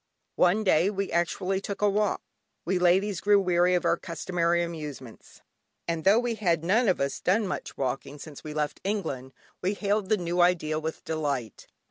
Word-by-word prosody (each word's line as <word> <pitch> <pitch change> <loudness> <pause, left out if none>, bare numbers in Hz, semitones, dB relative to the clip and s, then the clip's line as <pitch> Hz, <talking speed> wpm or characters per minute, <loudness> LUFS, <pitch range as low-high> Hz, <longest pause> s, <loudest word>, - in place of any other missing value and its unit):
One 185 +5 +3
day 185 -1 +3
we 200 -1 -3
actually 185 +3 0
took 200 +1 -5
a - - +5
walk. 205 0 0 0.4
We 185 +1 +1
ladies 185 +2 +2
grew 205 0 +5
weary 180 -1 +3
of 175 - 0
our - - +3
customary 170 0 -1
amusements, 150 -8 -8 0.4
and 165 0 -2
though 200 +3 +6
we 240 0 0
had 175 -7 0
none 215 +8 +3
of 185 - +2
us 140 0 -1
done 205 +4 +2
much 185 - -5
walking 135 +2 -3
since 145 0 -10
we 155 - -6
left 150 -1 -2
England, 160 -11 -3 0.3
we 190 +3 0
hailed 200 -1 -1
the 215 - +3
new 175 -1 0
idea 160 -3 +2
with 160 0 -5
delight. 140 - -3
175 Hz, 180 wpm, -27 LUFS, 155-200 Hz, 0.4 s, though